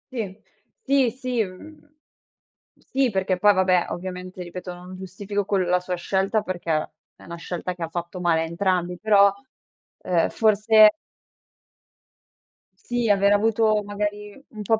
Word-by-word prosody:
Sì. 205 -3 -5 0.4
Sì, 275 -3 +3
sì 250 -2 -2
mhmm, 295 +11 -12 0.9
sì. 265 -1 -1
Perché 190 -2 -1
poi 210 +1 +6
vabbè, 185 -2 +2
ovviamente, 180 0 -6
ripeto, 180 +1 -8
non 180 +1 -11
giustifico 195 +2 -4
quel 195 -2 0
la 180 0 +2
sua 180 0 -4
scelta, 195 +4 0
perché 175 -3 -4 0.4
è - - -18
una 170 - -8
scelta 175 +1 -5
che 175 - -15
ha 165 - -1
fatto 175 +2 -5
male 165 -2 +2
a - - 0
entrambi, 180 +1 -1
però, 200 -2 +5 0.7
ehm, 175 -2 +1
forse 215 0 +5 1.9
sì, 240 -2 -2
aver 200 0 +4
avuto 215 0 +2
magari, 205 +3 -5
un 215 -2 -9
po' 220 +2 +1
195 Hz, 140 wpm, -23 LUFS, 180-215 Hz, 1.9 s, poi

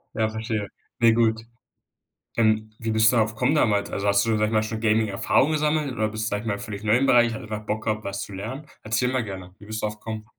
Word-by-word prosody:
Ja, 110 -1 +1
verstehe, 110 -2 -3 0.3
ne 115 -1 +5
gut. 110 -1 +2 1.0
Ähm, 110 -1 +2
wie 110 - -3
bist 110 +1 +4
du - - +1
darauf 110 -1 +2
gekommen 125 +7 +1
damals? 105 -8 +2
Also, 100 +1 -2
hast 100 0 +4
du, 115 - +1
sage 105 0 +2
ich - - -3
mal, 110 -1 +3
schon 110 0 -4
Gaming-Erfahrung 110 +6 +2
gesammelt, 150 -2 +1
oder 110 -2 0
bist 110 +1 -4
du, 110 - -1
sage 105 0 -1
ich - - -10
mal 100 - -1
völlig 100 0 -7
neu 110 +2 +3
im 135 +2 +2
Bereich? 120 -3 +4
Hast - - -7
einfach 105 -1 -6
Bock 110 +1 -2
gehabt, 110 -1 -1
was 100 0 -4
zu 100 - -8
lernen? 115 +10 -6 0.2
Erzähl 110 +4 0
mal 130 - +1
gerne. 95 -3 -8
Wie 105 - -14
bist 110 +1 -5
du - - +1
darauf 105 0 -6
gekommen? 110 -1 -6
110 Hz, 260 wpm, -24 LUFS, 105-115 Hz, 1.0 s, ne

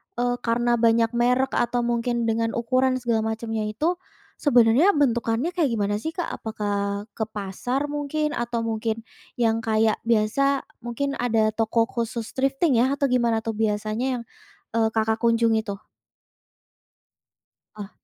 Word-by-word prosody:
eee, 245 0 0
karena 240 0 +1
banyak 230 0 +3
merek 250 +2 +2
atau 240 0 0
mungkin 235 0 0
dengan 225 0 0
ukuran 255 +2 +1
segala 225 -3 0
macamnya 225 -1 -3
itu, 320 +12 -1 0.4
sebenarnya 250 - +4
bentukannya 240 +1 +1
kayak 315 -9 0
gimana 205 -1 0
sih 320 +8 -5
Kak? 350 - -3
Apakah 205 -2 -3
ke 220 - -3
pasar 230 +8 -3
mungkin 295 +1 -1
atau 240 -4 -2
mungkin 225 0 -2 0.3
yang 225 -2 +1
kayak 220 -1 +1
biasa 245 +5 +2 0.2
mungkin 260 +4 -3
ada 225 -3 +2
toko 225 +1 +1
khusus 230 -1 -4
thrifting 270 0 +1
ya 260 +3 +2
atau 280 -2 0
gimana 235 -3 +2
tuh 225 - -2
biasanya 215 +2 -1
yang, - - -8 0.5
eee, 225 0 +2
Kakak 220 0 +1
kunjungi 230 -1 +2
tuh? 200 0 -6 1.9
Ah. 205 -2 -7
230 Hz, 140 wpm, -24 LUFS, 220-250 Hz, 1.9 s, sebenarnya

